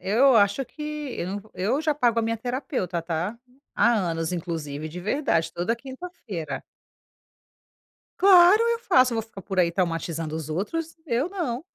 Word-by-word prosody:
eu 245 +6 +4
acho 205 +6 +3
que 300 - -11 0.3
eu 175 - -3
nã 205 - -7
eu 230 +10 0
já 310 -1 +1
pago 240 -5 +2
a - - +2
minha 230 0 0
terapeuta, 245 - -3
tá? 170 +6 -3 0.4
Há 235 - +4
anos 165 -5 -1
inclusive, 160 -4 -4
de 175 +3 -7
verdade, 175 - 0
toda 180 +8 -1
quinta-feira. 260 - -7 1.6
Claro, 380 +1 +7
eu 465 0 -1
faço. 255 - +4
Eu - - -1
vou 225 - 0
ficar 220 -3 -11
por 190 0 0
aí 170 -1 +3
traumatizando 165 -3 -2
os 160 -2 -5
outros? 315 - -3
Eu 260 +4 0
não. 310 -9 -3
220 Hz, 165 wpm, -25 LUFS, 170-270 Hz, 1.6 s, Claro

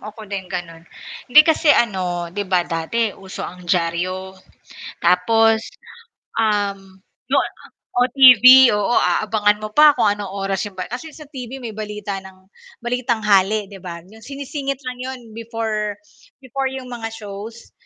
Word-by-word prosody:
ako 215 +1 -10
din 195 -2 -6
gano'n, 175 -3 -6 0.5
hindi 275 +5 +9
kasi, 320 0 +2
ano, 180 -6 -1
'di 205 +1 -3
ba, 180 -2 +2
dati 200 +7 -2
uso 190 -1 -8
ang 180 0 -10
diaryo 180 +2 -1 0.7
tapos, 220 +6 +3 0.8
um, 200 -3 -1 0.3
yu - - +2
ah - - 0 0.4
o 245 +1 +2
TV 255 -1 +8
oo, 210 +3 0
aabangan 210 -1 +1
mo 215 - -5
pa 300 0 +8
kung - - +3
anong 205 -2 -3
oras 195 0 -2
'yong 205 - -7
pa 185 - -5
kasi 280 +7 -7
sa 300 -1 -13
TV 260 -2 -8
may 225 -3 -7
balita 210 -1 -5
ng 190 0 -16 0.3
Balitanghali, 215 -4 +1
'di 200 - -11
ba, 170 -1 -7
'yong 210 +6 -17
sinisingit 275 0 -5
lang 250 - -6
'yon 260 0 -6 0.2
before, 220 -2 -3 0.4
before 270 0 -3
'yong 260 -1 -7
mga 230 -2 -6
shows, 220 +1 -9
215 Hz, 150 wpm, -20 LUFS, 190-245 Hz, 0.8 s, hindi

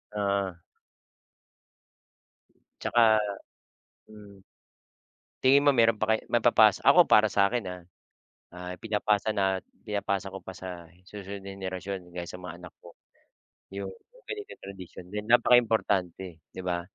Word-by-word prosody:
Oo. 100 -3 -1 2.3
'Tsaka, 110 -2 +4 0.9
hmm. 100 -2 -14 1.0
Tingin 140 +2 +6
mo - - +8
meron 115 -2 +3
pa 110 0 +2
kaya - - -12
maipapasa 115 -3 +5
ako, 175 0 +8
para 110 0 +5
sa'kin, 100 +3 +1
ah. 90 -1 -7 0.7
Ah, 90 +1 -7
ipinapasa 105 +1 0
na 95 -3 0 0.2
pinapasa 100 -2 -2
ko 95 - -7
pa - - -9
sa 90 -3 -9 0.2
susunod 100 -1 -8
na 100 - -7
henerasyon, 95 -1 -6
gaya 85 0 -6
sa 90 +1 -9
mga 85 -1 -8
anak 90 -1 -12
ko, 85 - -13 0.8
'yong 100 -1 -5 0.3
ganitong 420 -1 -8
tradisyon 95 -2 -10
din. 105 0 -4
Napakaimportante, 100 -8 +2
'di 95 - -8
ba, 90 -1 -1
100 Hz, 125 wpm, -28 LUFS, 90-110 Hz, 2.3 s, mo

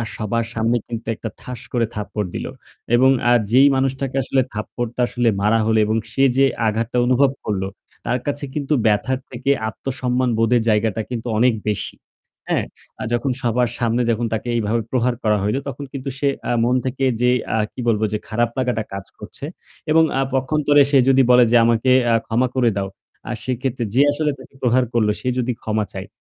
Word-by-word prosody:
সবার 115 +1 -1
সামনে 115 +2 +1
কিন্তু 115 -1 -6
একটা 110 - -6
ঠাস 125 -2 -7
করে 120 -2 +2
থাপ্পড় 105 -1 -3
দিল। - - -4 0.5
এবং 130 +2 +5 0.2
আ - - +5 0.2
যেই 135 +3 +7
মানুষটাকে 135 0 -1
আসলে 130 +1 +1
থাপ্পড়টা 120 +3 -5
আসলে 120 -1 +1
মারা 105 +2 +3
হল 110 - +2
এবং 110 +1 0 0.2
সে 135 - +1
যে 135 - +6 0.2
আঘাতটা 115 +3 -1
অনুভব 130 +2 +3
করল 100 -3 -2 0.4
তার 125 +1 0
কাছে 145 0 -2
কিন্তু 150 0 -1
ব্যথার 110 +5 +1
থেকে 130 +3 -1 0.2
আত্মসম্মানবোধের 125 -1 0
জায়গাটা 110 0 +1
কিন্তু 120 -1 -4
অনেক 120 +1 +4 0.2
বেশি। 105 - -1 0.5
হ্যাঁ? - - +1 0.4
আ - - -2
যখন 130 +2 0
সবার 120 -1 +1
সামনে 120 +1 +1
যখন 115 +1 -1
তাকে 110 +2 -3
এইভাবে 115 0 0
প্রহার 125 -1 +1
করা 105 -1 +3
হইল 105 +6 0
তখন 140 +1 -5
কিন্তু 135 0 -4
সে 140 - +1 0.2
আ - - +1
মন 125 +2 +2
থেকে 135 +1 -1 0.2
যে 125 - +4 0.3
আ - - +2 0.2
কি - - -11
বলব 110 -2 +2
যে - - +1
খারাপ 120 +2 0
লাগাটা 125 -4 0
কাজ 100 0 -6
করছে 110 +6 -8 0.5
এবং 160 +1 +6 0.2
আ - - +3
পক্ষান্তরে 145 +2 +3
সে 140 - +5
যদি 135 0 +5
বলে 125 0 +7
যে 120 - +6
আমাকে 120 +2 +2 0.2
আ - - +5
ক্ষমা 120 +3 +1
করে 125 -2 +3
দাও, 95 0 -1 0.4
আ - - -2
সেক্ষেত্রে 130 0 -2
যে 130 - +4
আসলে 150 +1 0
তাকে 130 - -15
প্রহার 125 0 +3
করল 110 -3 +2
সে 130 - -5
যদি 125 0 0
ক্ষমা 110 -1 -1
চায়। 95 +1 -6
120 Hz, 190 wpm, -20 LUFS, 110-130 Hz, 0.5 s, যেই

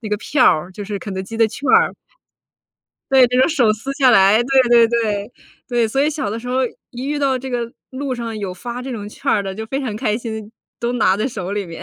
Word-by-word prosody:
那 220 - -6
个 210 - 0
票 255 +5 +1
儿， 175 +4 +3
就 205 +2 -7
是 205 0 -4
肯 200 - -7
德 190 - -3
基 225 +4 -8
的 225 0 +4
券 245 +6 -6
儿。 450 +2 +4 1.2
对， 260 -2 +7
就 250 +1 0
用 260 - +5
手 265 -10 +2
撕 265 +6 -5
下 275 -2 +4
来， 210 +1 +5
对 265 +1 +4
对 235 -1 +6
对。 220 -2 -1 0.4
对， 240 -2 +2
所 270 +5 0
以 295 - +2
小 295 -9 -3
的 220 - -3
时 245 - -8
候 255 +1 +1 0.3
一 245 +1 -7
遇 295 0 -1
到 270 -2 +1
这 260 +1 -7
个 235 -1 -2 0.2
路 270 0 -3
上 230 -2 -5
有 195 -3 -4
发 240 +6 -6
这 260 +1 -6
种 210 -4 -5
券 210 - -4
儿 205 - +2
的， 195 -1 -5
就 220 +2 -6
非 270 +4 -3
常 235 -6 -3
开 215 -2 0
心， 220 -3 -6 0.3
都 235 +1 -1
拿 210 -6 +3
在 210 +4 -1
手 190 -5 -5
里 205 -2 -2
面。 165 -1 -9
235 Hz, 275 characters per minute, -19 LUFS, 210-260 Hz, 1.2 s, 对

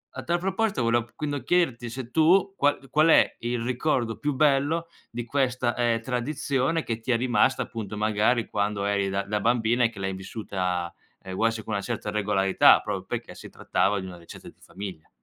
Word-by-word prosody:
a - - -5
tal 175 +1 +1
proposito 190 - -1
volev 115 0 0
quindi 145 -2 -3
chiederti 135 -10 +1
se 125 0 -7
tu, 185 +6 +4
qual 145 -4 0
qual 155 +1 +4
è 165 - +5
il 120 0 -2
ricordo 120 -2 -1
più 145 -1 -1
bello 150 +4 +2 0.2
di 120 0 -5
questa, 125 -2 0
ehm, 120 -2 +1
tradizione 135 +4 -1
che 115 -1 -3
ti 115 +3 -11
è 115 - +3
rimasta 120 0 +2
appunto 105 -3 -6
magari 110 +3 +1
quando 100 -1 -1
eri 100 -1 0
da 100 +1 -1
da 105 +1 -2
bambina 120 +1 +2
e - - +2
che 115 - -17
l'hai 95 0 -2
vissuta, 95 -3 -3 0.3
ehm, 95 - -7
vuoi, 115 +4 +2
sì, 110 -1 -6
con 110 - -5
una 100 - -1
certa 110 -3 -4
regolarità, 100 -2 +4
proprio - - -4
perché - - -5
si - - -11
trattava 105 - 0
di 95 - -6
una 90 -2 -9
ricetta 85 - -12
di - - -22
famiglia. 95 -5 -9
120 Hz, 195 wpm, -26 LUFS, 105-135 Hz, 0.3 s, è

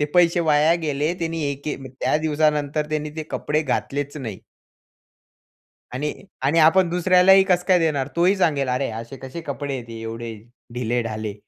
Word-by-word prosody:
ते 150 - +3
पैसे 175 -1 +4
वाया 155 0 +4
गेले. 150 +3 -1
त्यांनी 165 -1 -2
एक 140 0 -6 0.4
त्या - - +2
दिवसानंतर 150 -1 0
त्याने 150 0 -2
ते 160 - -3
कपडे 155 +1 -1
घातलेच 145 +1 -2
नाही. 115 -9 -6 1.5
आणि 150 +4 -2 0.3
आणि 145 +5 +2
आपण 170 +3 +5
दुसऱ्यालाही 185 +2 +5
कसं 180 -2 +1
काय 185 -2 +5
देणार? 145 -5 0
तोही 180 +4 +3
सांगेल, 145 -7 +1
"अरे, 125 +2 0
असे 115 +4 -7
कसे 135 +6 -8
कपडे 140 -2 -4
आहेत 120 -3 -6
एवढे 115 0 -6 0.4
ढीले-ढाले." 115 -3 -2
150 Hz, 150 wpm, -22 LUFS, 135-165 Hz, 1.5 s, आपण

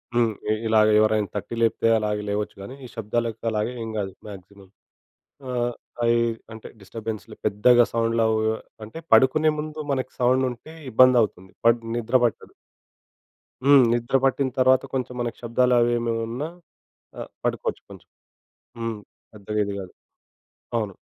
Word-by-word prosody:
హ్మ్. 115 -2 +3 0.2
ఇ - - +4
ఇలాగ 110 -1 +4
ఎవరైనా 110 -1 +2
తట్టి 105 +3 -4
లేపితే 115 0 +2
అలాగ 105 -1 -1
లేవచ్చు 105 0 -2
గానీ, 115 +7 -8
ఈ - - -8
శబ్దాలకి 115 +1 -2
అలాగ 105 0 -1
ఏం 115 - -4
కాదు 95 -2 -3
మాక్సిమం. 100 0 -12 0.8
ఆహ్, 120 -1 -1 0.4
ఐ - - +5 0.4
అంటే 110 - -10
డిస్టర్బెన్స్‌లు 110 +2 -7
పెద్దగా 120 +4 +5
సౌండ్లు 115 0 +1
అవు 110 - +1 0.5
అంటే 110 +10 -9
పడుకునే 155 +4 +5
ముందు 155 0 -6
మనకి 130 -1 -2
సౌండుంటే 130 +3 0 0.2
ఇబ్బందౌతుంది. 115 -6 +4 0.2
బట్ 115 0 +5 0.2
నిద్ర 120 +1 -2
పట్టదు. 115 - -3 1.1
హ్మ్. 140 -1 +8
నిద్ర 120 +2 -1
పట్టినతర్వాత 130 -1 +2
కొంచెం 130 -1 -2
మనకి 120 -1 -3
శబ్దాలవి 120 0 +3
ఏమివున్నా 115 +4 -2 0.7
ఆహ్, - - -7
పడుకోవచ్చు - - -2
కొంచెం. - - -13 0.7
హ్మ్. 115 -2 -3 0.4
పెద్దగా 105 +1 -5
ఇది 100 0 -4
కాదు. 95 -2 -9 0.8
అవును. 105 -4 -2
115 Hz, 130 wpm, -24 LUFS, 105-125 Hz, 1.1 s, హ్మ్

